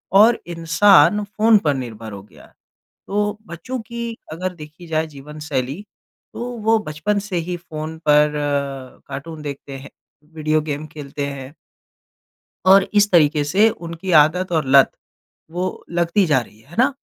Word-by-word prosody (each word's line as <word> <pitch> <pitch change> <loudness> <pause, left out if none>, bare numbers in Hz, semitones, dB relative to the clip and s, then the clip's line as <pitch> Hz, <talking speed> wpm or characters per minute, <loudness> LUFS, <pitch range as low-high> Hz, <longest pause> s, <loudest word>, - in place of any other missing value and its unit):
और 220 +4 +6
इंसान 175 +5 +4
फ़ोन 215 +2 +3
पर 145 -2 +2
निर्भर 115 -4 -7
हो 100 -1 -8
गया - - -18
है। - - -23 0.5
तो 210 +1 -1
बच्चों 250 +10 -6
की 235 +1 -6 0.2
अगर 180 +3 -4
देखी 155 +1 -12
जाए 160 0 -1
जीवन 150 0 -11
शैली 140 +3 -3 0.5
तो 240 +1 -4
वो 225 +1 +3
बचपन 180 +8 -1
से 200 -2 -4
ही 175 +1 -2
फ़ोन 160 -2 -7
पर 150 0 +5
अ, 140 -3 -3
कार्टून 150 +3 -7
देखते 140 -1 -7
हैं, 140 - -12 0.4
वीडियो 155 0 +1
गेम 150 0 -4
खेलते 145 -2 -6
हैं। 140 +1 -7 1.1
और 195 +1 +6
इस 205 0 +3
तरीके 150 -3 +4
से 200 +9 +4 0.2
उनकी 170 +3 -5
आदत 180 +4 -3
और 135 - -5
लत 135 - +7 0.6
वो 180 +2 -2 0.3
लगती 175 +3 +2
जा 150 -6 +3
रही 110 -2 -15
है, 110 - -24
है 170 - -13
ना? 265 +2 +3
160 Hz, 160 wpm, -20 LUFS, 145-195 Hz, 1.1 s, लत